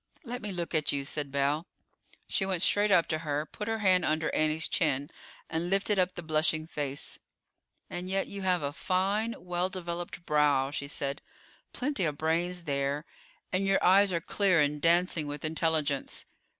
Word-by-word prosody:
"Let 245 -2 -5
me 210 - -4
look 175 -2 -4
at 155 -2 +2
you," 140 -1 -1
said 145 0 -3
Belle. 140 +4 +1 0.6
She 195 - 0
went 190 -2 +1
straight 205 +1 +4
up 180 -4 +5
to 155 - 0
her, 150 -1 -2
put 210 +6 -7
her 225 0 0
hand 185 -4 +4
under 155 +1 0
Annie's 155 +1 +2
chin, 145 -3 0 0.4
and 165 +2 -2
lifted 195 +1 +2
up 185 0 +1
the 175 - -6
blushing 155 0 +1
face. 145 -3 -4 0.7
"And 180 +1 -5
yet 195 0 +1
you 200 - -7
have 180 -4 +1
a 140 0 -2
fine, 200 +7 0
well 180 +1 -2
developed 175 -2 -5
brow," 145 -3 +3
she 140 -1 -3
said; 140 -1 -3 0.5
"plenty 260 -6 -1
of 150 -2 -1
brains 170 +3 0
there, 140 0 -1 0.5
and 185 +1 +1
your 195 - +2
eyes 195 +2 +6
are 170 - +1
clear 190 -1 +2
and 150 0 +1
dancing 170 -2 +2
with 145 +1 -5
intelligence. 155 -3 -1
165 Hz, 175 wpm, -30 LUFS, 150-185 Hz, 0.7 s, eyes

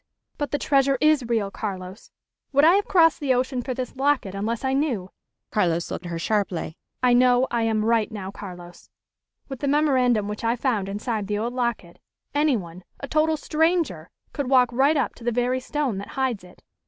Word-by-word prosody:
"But 290 - -1
the 290 - -1
treasure 275 -2 +2
is 305 -4 +3
real, 215 -4 0
Carlos. 190 -1 -6 0.4
Would 280 +2 +5
I 335 - +7
have 405 +1 +2
crossed 330 -4 +4
the 270 -3 +1
ocean 255 0 -1
for 255 +1 -4
this 255 0 -5
locket 270 -7 +1
unless 220 +5 -3
I 265 - +1
knew?" 255 -10 -1 0.4
Carlos 170 -5 0
looked 175 - -5
at - - -6
her 170 - -3
sharply. 185 -3 -1 0.3
"I 250 -1 +5
know 250 +1 +4
I 235 - 0
am 215 -1 0
right, 230 -1 +2
now, 195 -3 -6
Carlos. 175 -3 -11 0.6
With 270 -3 -7
the 285 - -2
memorandum 260 -7 +2
which 210 +1 -5
I 230 +1 +1
found 225 -6 -1
inside 210 0 -3
the 205 0 -1
old 235 +3 -2
locket, 235 -9 -3 0.3
anyone, 215 - 0 0.2
a 275 - -6
total 310 +2 +2
stranger, 310 - 0 0.2
could 280 -3 -3
walk 250 -2 +4
right 275 +5 +3
up 280 - 0
to - - -13
the 240 - 0
very 245 +2 0
stone 255 -5 -2
that 200 - -7
hides 255 -7 -1
it." 180 - -17
245 Hz, 195 wpm, -24 LUFS, 205-275 Hz, 0.6 s, I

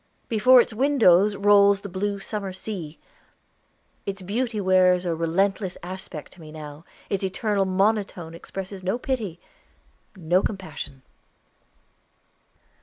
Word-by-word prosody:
Before 240 +3 +6
its 240 - +2
windows 215 -7 +4
rolls 200 0 +5
the 200 - -6
blue 200 +2 -2
summer 195 -1 -4
sea. 185 -6 -6 1.1
Its 195 -1 -5
beauty 225 +3 -2
wears 185 -1 +3
a 170 -2 0
relentless 185 +4 0
aspect 180 -4 -8
to 180 - -16
me 155 -1 -11
now; 150 0 -10 0.3
its 195 -1 -1
eternal 195 +1 0
monotone 190 -3 0
expresses 190 +3 -7
no 190 +5 -1
pity, 225 -10 -3 0.8
no 180 0 +1
compassion. 185 -10 -6
195 Hz, 115 wpm, -24 LUFS, 180-205 Hz, 1.1 s, Before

